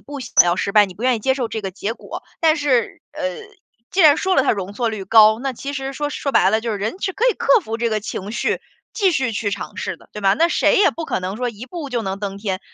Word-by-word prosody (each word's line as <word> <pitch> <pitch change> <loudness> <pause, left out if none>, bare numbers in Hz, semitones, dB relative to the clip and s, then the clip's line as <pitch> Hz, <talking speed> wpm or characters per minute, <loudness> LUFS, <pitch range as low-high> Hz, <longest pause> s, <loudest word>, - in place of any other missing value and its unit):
不 285 0 -9
想 235 -7 +4
要 175 0 +1
失 200 - -2
败， 210 -1 +6
你 185 - -11
不 215 - -10
愿 255 -1 +3
意 225 - -4
接 265 +4 +1
受 255 -4 -2
这 220 - -5
个 195 - -3
结 200 +3 -4
果。 - - -9 0.2
但 320 -1 +4
是， 260 -6 0
呃， 300 - -7 0.7
既 385 - +1
然 305 -4 +7
说 380 -1 0
了 - - +4
它 270 - +2
容 200 -2 -3
错 235 +2 -1
率 215 -3 -5
高。 215 +2 +6
那 270 +1 -3
其 275 +4 -6
实 270 -1 -4
说 290 +1 -3
说 280 -1 -3
白 190 - +4
了， 220 +1 +2
就 230 0 -3
是 205 - -3
人 220 - -4
是 380 - -2
可 460 - -1
以 - - -3
克 - - +3
服 225 - -5
这 235 - 0
个 215 -1 -1
情 205 0 -6
绪， - - -1 0.3
继 390 -5 +2
续 260 -5 0
去 210 -1 -2
尝 - - -6
试 - - -4
的， - - -21
对 210 - -7
吧？ 195 -1 +3
那 335 +1 +3
谁 425 +6 +3
也 395 - +5
不 330 - -6
可 - - -2
能 185 +3 -4
说 250 0 -2
一 230 0 -8
步 295 -1 -7
就 240 -2 -1
能 195 0 -4
登 200 -1 -5
天， 195 -2 -3
235 Hz, 315 characters per minute, -20 LUFS, 205-285 Hz, 0.7 s, 然